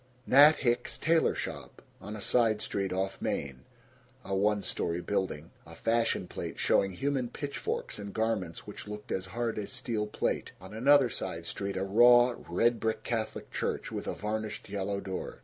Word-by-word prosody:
Nat 145 +4 +8
Hicks's 120 -3 0
Tailor 165 0 +3
Shop, - - -6 0.2
on 105 +2 -6
a 105 - -7
side 110 0 +2
street 100 -2 -2
off 95 +1 -2
Main. 65 -3 -3 0.6
A 95 - -2
one 105 +1 +2
story 85 0 -2
building. 90 -4 -2
A - - -13
fashion 115 -5 +1
plate - - -6
showing 95 -1 +2
human 135 +2 -1
pitchforks 140 -4 -4
in 100 -1 -6
garments 110 -6 -2
which - - -9
looked 105 0 -7
as 95 0 -2
hard 115 +2 -2
as 100 -1 -4
steel 105 -2 -2
plate. 105 - -2
On 95 +2 -11
another 130 +2 +5
side 85 0 -5
street 100 +2 -4
a 95 - 0
raw 120 +5 +6 0.2
red 115 +7 +2
brick 110 0 -1
Catholic 110 -2 -3
Church - - -2
with - - -5
a - - -2
varnished 110 +2 -4
yellow 100 0 -2
door. 95 -1 -5
105 Hz, 170 wpm, -30 LUFS, 95-120 Hz, 0.6 s, Nat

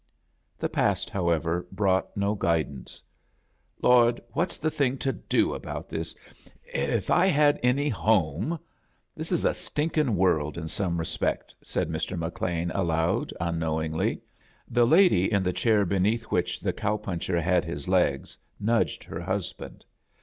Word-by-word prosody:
The - - -1
past, - - 0
however, 85 -2 0
brought 95 -1 0
no 100 +1 +1
guid 85 -6 +1
ance. 65 -3 -11 0.8
"Lord, 120 -1 +5
what's 170 +1 -1
the 155 +1 -1
thing 135 -3 0
to 135 -1 -1
do 100 - 0
about - - -6
this? 80 0 -4 0.5
If - - -2
I 180 +2 +5
had 150 -4 +4
any 130 +4 +2
home 105 - +1 0.3
— - - -44
This 160 +3 -6
is 175 - +1
a - - +3
stinkin' 150 -6 -1
world 80 -5 +1
in 80 -1 -4
some 85 0 -2
respects," 80 - -2
said - - -2
Mr.SIcLean, 85 +1 -2
aloud, 80 -3 0
unknowingly. 80 -1 -1 0.5
The 120 0 +3
lady 160 - +5
in 100 -3 +2
the 90 -1 0
chair 105 -1 +2
beneath 100 +5 +1
which 90 - 0
the - - -1
cow 105 - -1
puncher 90 -3 -2
had 90 +1 +2
his 70 +2 -6
legs 90 -8 +1 0.2
nudged 115 +3 +1
her - - -7
husband. - - -5
95 Hz, 145 wpm, -27 LUFS, 85-120 Hz, 0.8 s, Lord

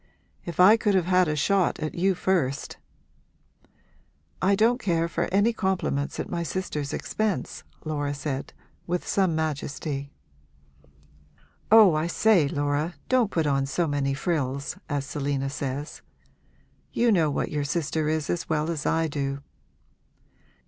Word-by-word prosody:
If 170 - -7
I 200 +5 +8
could 210 -3 +1
have 185 -3 +2
had 180 -1 +3
a 150 - 0
shot 190 +4 +2
at 155 - -3
you 190 +2 +1
first!' 165 -8 -1 1.6
'I 195 +2 +3
don't 230 +5 +3
care 165 -3 +1
for 170 0 -1
any 205 +5 +3
compliments 190 -9 -1
at - - -3
my 170 - -3
sister's 160 -4 -3
expense,' 215 -3 -2 0.2
Laura 145 -2 -2
said, 140 -1 -4 0.4
with 180 0 -2
some 190 -5 +2
majesty. 145 -2 -3 1.6
'Oh 215 -5 +8
I 155 +2 0
say, 185 -4 +3
Laura, 145 +2 -1
don't 255 -5 +3
put 165 -5 0
on 135 -1 +1
so 165 +6 0
many 140 -2 -1
frills, 140 -3 -2
as 145 -1 -1
Selina 140 -1 -2
says. 140 +1 -5 0.9
You 235 0 +2
know 165 -7 +3
what 145 - -2
your 150 -2 -1
sister 155 +1 -1
is 155 -1 -1
as 175 - -3
well 155 0 0
as 155 -3 -3
I 165 0 +2
do!' 140 -2 -3
160 Hz, 140 wpm, -26 LUFS, 145-185 Hz, 1.6 s, I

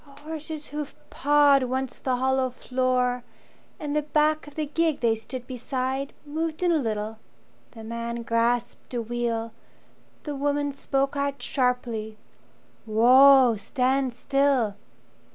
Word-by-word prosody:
A 280 0 -16
horse's 310 0 -7
hoof 295 -1 -5 0.2
pawed 290 -1 +4
once 260 0 -2
the 260 -1 -2
hollow 260 +1 +1
floor, 250 -1 0 0.6
And 295 -1 -3
the 300 - +3
back 305 +1 +1
of 295 - -13
the 310 - -1
gig 315 0 0
they 230 -2 +3
stood 245 +3 -8
beside 260 +2 -3
Moved 315 +3 -3
in 350 - +3
a 325 - +3
little. 220 -3 -3 0.5
The 225 -2 -10
man 235 +1 -4
grasped 235 +2 -1
a 240 - 0
wheel, 230 -1 -2 0.7
The 295 - -4
woman 285 +1 0
spoke 275 0 -1
out 280 0 -1
sharply, 240 -5 -1 0.7
"Whoa, 250 +2 +7
stand 260 +2 0
still!" 275 -5 +1
260 Hz, 135 wpm, -26 LUFS, 240-290 Hz, 0.7 s, Whoa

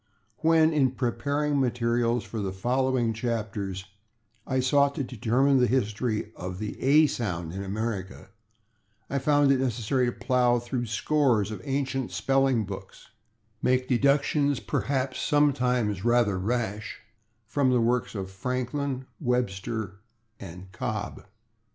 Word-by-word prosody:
When, 160 0 +4
in 135 -4 +2
preparing 140 +4 0
materials 120 -1 +1
for 115 - -6
the 100 -2 -2
following 125 +3 0
chapters, 105 -5 -3 0.6
I 130 -1 0
sought 140 +2 +3
to 140 - -1
determine 130 +3 +2
the 125 - +4
history 110 -2 -1
of 90 0 -6
the 105 +1 -4
/a/ 150 +4 +5
sound 90 - -3
in 95 +1 -4
America, 100 -1 -4 0.8
I 140 - +1
found 145 0 +3
it 135 - +3
necessary 125 0 0
to - - 0
plow 120 0 +2
through 120 0 -3
scores 115 -3 +1
of 105 -4 -6
ancient 135 -2 -2
spelling 135 -4 +1
books, 95 -1 -9 0.5
and - - 0
to 130 - +5
make 130 0 -3
deductions, 140 +2 +2
perhaps 130 -1 -2
sometimes 125 -9 +1
rather 120 -5 +2
rash, 110 0 -3 0.4
from 130 +4 +1
the 125 -1 +3
works 120 0 0
of 95 -1 -5
Franklin, 130 +5 -3
Webster 110 - -2 0.4
and 95 0 -10
Cobb. 110 -3 -5
120 Hz, 130 wpm, -27 LUFS, 105-135 Hz, 0.8 s, a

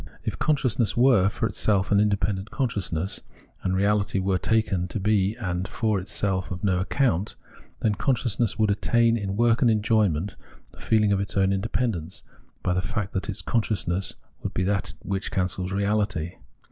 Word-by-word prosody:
If - - -3
consciousness 130 -8 +1
were, 120 -6 +5
for - - -2
itself, 100 -2 +1
an 100 - +5
independent 100 -1 0
consciousness, 100 - -2 0.4
and 95 0 0
reahty 100 0 +1
were 95 -1 +1
taken 95 -4 +1
to 105 - -4
be 105 0 +2
in 115 - -6
and 90 +1 -2
for 110 -3 0
itself 95 -1 -1
of 90 -1 -6
no 95 -3 +2
account, 95 -1 0 0.5
then 110 - +2
consciousness 120 -2 0
would 110 -1 +3
attain, 115 +3 +3
in 100 -3 -3
work 115 0 +3
and 125 - +5
enjoyment, 105 -5 +1 0.3
the - - -18
feehng 105 -2 +3
of 100 - +1
its 100 0 -3
own 95 0 +3
independence, 95 -3 -2 0.4
by 90 - +1
the 90 - +1
fact 100 -1 -3
that 95 +2 -2
its 95 - -3
consciousness 100 -5 -1 0.3
would - - -5
be 95 - +1
that 100 +2 -1
which 95 0 -2
cancels 90 0 -1
reahty. 100 -4 -1
100 Hz, 170 wpm, -25 LUFS, 95-110 Hz, 0.5 s, were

